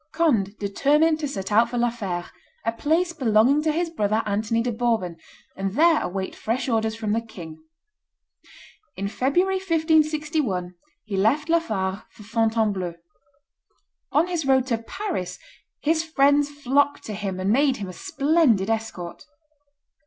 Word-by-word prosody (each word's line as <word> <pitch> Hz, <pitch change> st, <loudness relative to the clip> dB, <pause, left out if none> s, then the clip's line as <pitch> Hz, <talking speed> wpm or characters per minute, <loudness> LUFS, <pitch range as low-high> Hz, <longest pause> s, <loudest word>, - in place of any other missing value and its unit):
Conde 230 Hz, -, +1 dB
determined 295 Hz, +10 st, +2 dB
to 300 Hz, -, -2 dB
set 195 Hz, -7 st, -5 dB
out 225 Hz, +3 st, +4 dB
for 245 Hz, -, -3 dB
La 240 Hz, 0 st, +2 dB
Fere, 185 Hz, -7 st, -4 dB, 0.4 s
a 230 Hz, -, +2 dB
place 320 Hz, +9 st, 0 dB
belonging 255 Hz, 0 st, +3 dB
to 310 Hz, 0 st, +1 dB
his 335 Hz, +2 st, -1 dB
brother 215 Hz, -6 st, 0 dB
Anthony 220 Hz, +3 st, 0 dB
de 245 Hz, -, -1 dB
Bourbon, 225 Hz, -7 st, 0 dB, 0.4 s
and 195 Hz, +1 st, -3 dB
there 325 Hz, +2 st, +4 dB
await 190 Hz, +1 st, -3 dB
fresh 230 Hz, +5 st, -2 dB
orders 220 Hz, -2 st, 0 dB
from 220 Hz, -2 st, -3 dB
the 225 Hz, +2 st, +1 dB
king. 170 Hz, -8 st, -10 dB, 1.4 s
In 200 Hz, +1 st, -2 dB
February, 350 Hz, -, +1 dB
1561, 310 Hz, -, +1 dB, 0.3 s
he 210 Hz, -3 st, -5 dB
left 265 Hz, -, +2 dB
La 335 Hz, 0 st, +5 dB
Fare 195 Hz, -9 st, -3 dB
for 210 Hz, -, -15 dB
Fontainebleau. 215 Hz, -5 st, 0 dB, 1.2 s
On 300 Hz, +5 st, +3 dB
his 350 Hz, -3 st, -2 dB
road 265 Hz, -2 st, +3 dB
to 235 Hz, -4 st, -1 dB
Paris 310 Hz, -, -4 dB, 0.5 s
his 320 Hz, +1 st, +2 dB
friends 290 Hz, -2 st, +3 dB
flocked 285 Hz, 0 st, +1 dB
to 215 Hz, -, -6 dB
him 195 Hz, -2 st, -4 dB
and 190 Hz, +2 st, 0 dB
made 270 Hz, +2 st, +3 dB
him 200 Hz, -, -5 dB
a 185 Hz, -, -8 dB
splendid 275 Hz, -, +2 dB
escort. 220 Hz, -3 st, -4 dB
235 Hz, 150 wpm, -24 LUFS, 205-300 Hz, 1.4 s, La